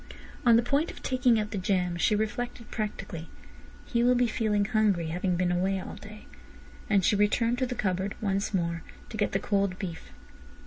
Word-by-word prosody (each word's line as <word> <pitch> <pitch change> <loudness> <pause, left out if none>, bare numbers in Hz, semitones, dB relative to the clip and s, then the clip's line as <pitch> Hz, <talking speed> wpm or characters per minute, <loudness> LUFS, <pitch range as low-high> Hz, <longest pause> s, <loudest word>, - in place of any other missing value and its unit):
On 235 - +8
the 235 - +4
point 285 +7 +1
of - - -10
taking 250 -3 +3
out 210 -1 -3
the 200 - -2
jam, 180 -2 0
she 175 +4 +2
reflected 235 +2 -3
practically: 195 -6 -4 0.6
"He 235 - 0
will 250 +1 +5
be 245 0 +3
feeling 215 -3 +1
hungry, 205 -7 +1
having 180 +2 0
been 175 0 +1
away 190 +2 +1
all - - -7
day," 215 0 -11 0.6
and 200 -4 +3
she - - +4
returned 230 +4 +2
to 255 - +1
the 250 - -4
cupboard 190 -1 -1
once 200 -1 -1
more 170 -3 -1 0.3
to 220 - -6
get 205 - +1
the - - +3
cold 200 -2 0
beef. 175 -5 -6
205 Hz, 190 wpm, -28 LUFS, 185-230 Hz, 0.6 s, On